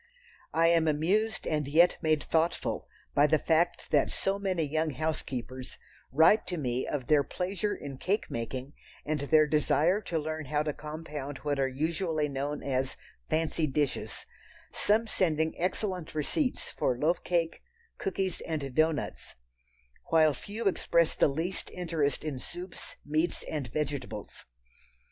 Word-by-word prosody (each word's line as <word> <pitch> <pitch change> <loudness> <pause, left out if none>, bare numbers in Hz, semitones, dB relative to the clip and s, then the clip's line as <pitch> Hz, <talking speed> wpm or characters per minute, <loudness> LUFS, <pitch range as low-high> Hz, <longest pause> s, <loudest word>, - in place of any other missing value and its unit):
I 165 +1 +5
AM 165 -1 +4
amused 195 +9 +1
and 150 -3 0
yet 170 +5 +5
made 155 -2 +2
thoughtful 165 +1 0 0.3
by 145 +1 +5
the 155 +1 +4
fact 165 +3 +1
that - - +4
so 195 +1 -1
many 185 -4 0
young 155 +2 0
housekeepers 130 -4 -4 0.3
write 160 - +5
to 180 - -2
me 125 -4 -1
of 140 -4 -2
their 150 0 +4
pleasure 195 +6 -2
in 135 -2 -7
cake 200 +4 0
making 125 +4 -4 0.3
and 150 0 0
their 155 +2 +5
desire 155 +5 +2
to 175 -5 -2
learn 155 0 -3
how 150 +2 0
to 150 -1 -1
compound 150 -2 -6
what 145 -2 0
are 135 - +3
usually 155 +3 0
known 145 +1 -3
as 135 -1 -1 0.3
"fancy 160 0 +1
dishes," 145 0 -2 0.5
some 220 +2 +2
sending 160 -7 +1
excellent 180 -2 -2
receipts 250 - -1
for 125 - 0
loaf 160 +6 +1
cake, 170 -2 0 0.4
cookies 190 -1 -1
and 145 -5 -3
doughnuts, 155 +1 0 0.7
while 155 -2 +4
few 210 - -6
express 170 -3 +2
the - - +4
least 165 +6 -2
interest 165 -5 -1
in 150 -4 -3
soups, 175 +7 -8
meats 155 +3 0
and 145 -5 -3
vegetables. 145 +2 -4
155 Hz, 145 wpm, -30 LUFS, 145-175 Hz, 0.7 s, I